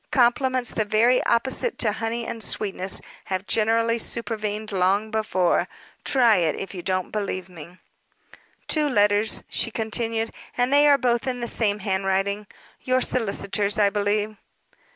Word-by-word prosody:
Compliments 255 0 +2
the 215 - 0
very 225 +4 +3
opposite 260 - 0
to 220 - +1
honey 225 +2 -3
and 230 0 -6
sweetness 195 -3 -2 0.2
have 190 0 -3
generally 230 +2 +2
supervened 215 -2 -3
long 195 +3 +1
before. 190 -5 +1 0.4
Try 240 -5 +4
it, 165 -4 +1
if 195 - -6
you 180 - -6
don't 185 0 -2
believe 195 -3 -3
me. 175 0 -12 0.9
"Two 300 -2 +2
letters," 205 -2 +3
she - - 0
continued, 225 0 -2 0.2
"and 250 +2 +1
they 290 +1 +6
are 285 -1 +6
both 240 -1 0
in 250 -1 -2
the 240 - -3
same 210 -3 +1
handwriting 195 +1 -1 0.3
your 255 0 +1
solicitors', 205 -3 0
I 205 -1 +3
believe." 210 +1 -1
215 Hz, 145 wpm, -24 LUFS, 200-235 Hz, 0.9 s, they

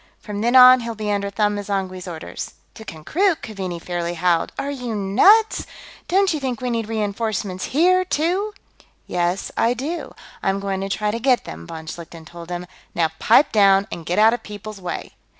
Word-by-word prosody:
From 210 -1 -6
then 240 +3 +1
on, 255 0 +9
he'll 230 -1 -5
be 210 -1 -3
under 200 -1 -1
Them 210 0 0
M'zangwe's 190 -2 -3
orders." 165 -2 -7 0.2
"To 220 - -11
Konkrook?" 320 - -1
Keaveney 190 -6 -5
fairly 175 0 -3
howled. 170 -1 +1
"Are 280 - -2
you 250 -5 -4
nuts? 385 - +4 0.4
Don't 385 0 +3
you 305 - -2
think 255 -4 -3
we 250 -1 -2
need 225 -2 -2
reenforcements 210 -3 -2
here, 365 +6 +3
too?" 370 +5 -1 0.5
"Yes, 175 +1 -1
I 235 +2 +2
do. 300 +8 -5 0.3
I'm 195 0 0
going 195 -1 -3
to 195 - -3
try 210 +1 -1
to 230 - -3
get 255 0 +2
them," 80 +1 -9
von 160 -1 -8
Schlichten 165 0 -9
told 170 +1 -11
him. 175 0 -4 0.3
"Now 165 -2 +2
pipe 240 +7 +5
down 195 -2 +5
and 170 - -6
get 175 +3 -2
out 220 +2 +6
of 240 - -3
people's 210 -1 -9
way." 180 - -5
210 Hz, 185 wpm, -21 LUFS, 180-250 Hz, 0.5 s, on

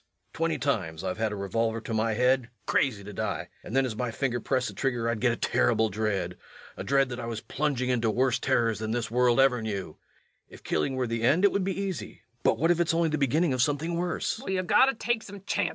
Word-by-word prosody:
Twenty - - 0
times 80 +2 -2
I've 95 +2 -3
had 110 -1 0
a - - -3
revolver 115 +3 -1
to 115 - -5
my 110 0 +1
head 125 +1 +2 0.2
crazy 110 -7 +1
to 105 +1 -9
die - - -3
and 115 - -6
then 135 0 +4
as 120 -4 -3
my 125 +2 -2
finger 120 +1 -1
pressed 130 +2 0
the - - -9
trigger 120 -4 -1
I'd 115 -1 -1
get 125 -1 +3
a - - -1
terrible 110 -1 +2
dread 100 -4 -2 0.4
a - - -6
dread 135 -1 +2
that 120 0 -5
I 115 - -5
was 115 -2 -4
plunging 140 -3 -1
into 115 -2 +1
worse 125 +2 +1
terrors 115 -3 +1
than 110 0 -3
this 115 -1 -2
world 125 +1 +3
ever 130 -3 +4
knew. 100 -7 -4 0.5
If - - -14
killing 130 - 0
were 130 -1 0
the 115 -1 -2
end 155 +11 +4
it 200 - +5
would 200 - 0
be 195 +1 -2
easy, 190 - -5 0.2
but - - +2
what 165 +2 +3
if 175 - +1
it's 170 -1 +2
only 165 -1 +2
the 155 -1 -1
beginning 150 +3 +2
of 130 - +1
something 150 +5 0
worse? 175 +6 -2
120 Hz, 220 wpm, -28 LUFS, 110-135 Hz, 0.5 s, it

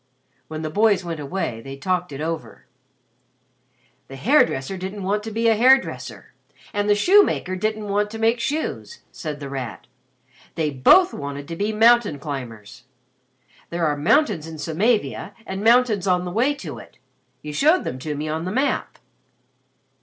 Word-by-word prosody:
When 155 0 -6
the 155 - -3
boys 205 -1 +2
went 165 -2 -4
away, 140 -6 -4
they 135 +2 -9
talked 180 +2 -2
it 140 +1 -6
over. 160 0 -5 1.4
"The 135 - -10
hair 265 - +4
dresser 155 +3 -4
didn't 190 +2 -6
want 205 +2 0
to 225 - -6
be 225 +2 0
a 225 - +4
hair 255 +5 +7
dresser, - - -9 0.4
and 205 0 -1
the 205 - +5
shoemaker 350 - +3
didn't 215 +2 -2
want 205 +1 0
to 225 - -7
make 225 +2 +2
shoes," 305 - -3
said 150 -3 -6
The 140 - -6
Rat. 125 -8 -6 0.7
"They 155 -2 -1
both 350 - +5
wanted 140 0 -6
to 165 - -4
be 205 +5 -1
mountain 225 -6 +4
climbers. 125 -6 -8 0.8
There 170 -1 -1
are 150 -1 +1
mountains 165 - +2
in 160 -1 -8
Samavia 165 - -1
and 190 +1 -5
mountains 225 -4 +3
on 180 -1 +2
the 180 - -4
way 255 +9 +1
to 180 - -8
it. - - -15 0.5
You 150 0 -6
showed 310 - +3
them 130 - -5
to 150 +3 -4
me 150 +2 -4
on 160 +2 -3
the 185 - -3
map. 265 +7 -1
185 Hz, 170 wpm, -22 LUFS, 150-220 Hz, 1.4 s, hair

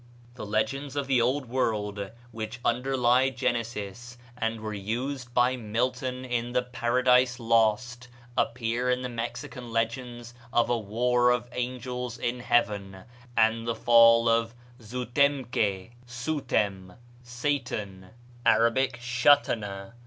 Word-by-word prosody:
The 120 -4 -8
legends 135 +7 -1
of 140 -1 -1
the 130 -3 +2
Old 130 +4 +1
World 105 -5 -1 0.2
which 110 +1 -6
underlie 125 +1 +2
Genesis, 120 -2 -3 0.2
and 115 -2 -2
were 110 0 -5
used 120 +6 -4
by 125 +1 +3
Milton 125 +3 -2
in 120 -1 -2
the 125 - +2
"Paradise 125 +1 +2
Lost," 115 +2 +1 0.3
appear 120 +1 0
in 125 0 +1
the 125 - -3
Mexican 120 +2 -6
legends 120 +1 -3 0.2
of 120 +1 +2
a - - +3
war 120 +4 +2
of 125 0 +1
angels 125 -1 -4
in 120 +1 -2
heaven, 105 -6 0 0.3
and 115 +1 +3
the 115 - 0
fall 115 0 +6
of 115 0 +1 0.3
Zou 125 +3 -5
tem 140 +2 +2
que 100 -3 -1 0.2
(Soutem, 120 -8 -2 0.3
Satan 120 -7 -3 0.3
Arabic, 120 +3 +3
Shatana?) 115 -5 +1
120 Hz, 125 wpm, -27 LUFS, 115-125 Hz, 0.3 s, fall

